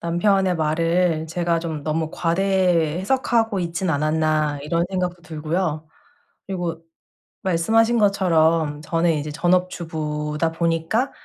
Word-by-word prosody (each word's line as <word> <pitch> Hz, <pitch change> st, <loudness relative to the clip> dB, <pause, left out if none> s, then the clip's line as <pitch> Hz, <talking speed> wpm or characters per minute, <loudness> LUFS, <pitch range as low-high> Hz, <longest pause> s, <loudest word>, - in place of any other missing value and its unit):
'남편의 180 Hz, +2 st, +1 dB
말을 165 Hz, +1 st, +1 dB
제가 170 Hz, 0 st, 0 dB
좀 160 Hz, -3 st, -5 dB
너무 160 Hz, 0 st, -1 dB
과대 175 Hz, -2 st, +1 dB
해석하고 225 Hz, -2 st, +1 dB
있진 170 Hz, +1 st, -2 dB
않았나.' 155 Hz, -1 st, +1 dB
이런 170 Hz, +3 st, 0 dB
생각도 180 Hz, -2 st, -2 dB
들고요. 160 Hz, 0 st, -3 dB, 0.6 s
그리고 175 Hz, -4 st, -4 dB, 0.6 s
말씀하신 225 Hz, +7 st, +2 dB
것처럼 165 Hz, -6 st, +2 dB
저는 165 Hz, +1 st, +1 dB
이제 150 Hz, 0 st, -3 dB
전업주부다 160 Hz, -3 st, -1 dB
보니까 165 Hz, -, 0 dB
165 Hz, 270 characters per minute, -22 LUFS, 155-185 Hz, 0.6 s, 말씀하신